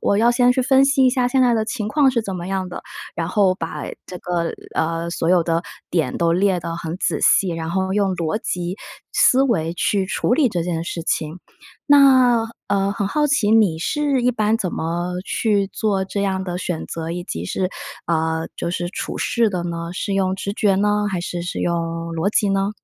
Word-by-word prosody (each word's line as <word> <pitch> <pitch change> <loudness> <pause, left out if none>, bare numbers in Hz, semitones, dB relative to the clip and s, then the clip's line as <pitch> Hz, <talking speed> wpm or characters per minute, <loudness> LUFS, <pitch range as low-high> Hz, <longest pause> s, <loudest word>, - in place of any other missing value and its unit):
我 200 - +2
要 230 +3 +4
先 245 0 +4
去 260 - 0
分 265 +1 +5
析 275 -1 +3
一 - - +5
下 250 -1 +1
现 260 +1 +2
在 245 -2 +4
的 220 -1 +1
情 215 -1 -3
况 280 +2 +3
是 235 -2 0
怎 195 -3 -5
么 175 0 -6
样 190 -1 -2
的？ 180 - -7 0.3
然 165 0 -2
后 195 -2 +3
把 165 -3 -5 0.2
这 180 - -8
个 170 -1 -2 0.2
呃， 165 +1 -1
所 165 -1 -1
有 180 -2 +4
的 165 0 0 0.3
点 160 -7 0
都 170 -1 +2
列 185 0 +2
的 165 +1 -4
很 165 0 -5
仔 - - -1
细， 195 - +4
然 165 -1 -4
后 190 +1 -1
用 200 -2 +1
逻 170 +4 -1
辑 180 +1 -3 0.4
思 260 +1 +5
维 170 -11 0
去 195 +1 0
处 220 - 0
理 275 -1 +3
这 175 -6 -2
件 165 -1 -2
事 170 0 -4
情。 160 +1 -2 0.5
那 260 -5 +6 0.2
呃， 200 0 +1
很 200 -1 -2
好 300 +4 +1
奇 265 -8 +2
你 210 -8 +4
是 285 - 0
一 250 - +3
般 215 -2 +1
怎 185 -5 -3
么 175 +2 -2
去 205 -3 +1
做 195 -1 -1
这 200 +1 -3
样 190 -1 -1
的 180 -1 -4
选 175 -2 -3
择， 165 0 -5
以 175 +1 -4
及 85 - -5
是 185 - -1 0.4
呃， 160 -1 0
就 170 - -3
是 175 0 -2
处 - - -5
事 235 -2 +2
的 180 -3 -2
呢， 170 -1 -4
是 200 +2 -3
用 190 -1 +1
直 195 +1 -4
觉 205 -1 +2
呢， 210 +1 +1
还 185 -2 -2
是 175 0 -4
是 175 - -4
用 170 - 0 0.4
逻 165 +4 0
辑 210 -1 +2
呢？ 195 +1 +1
190 Hz, 230 characters per minute, -21 LUFS, 170-220 Hz, 0.5 s, 那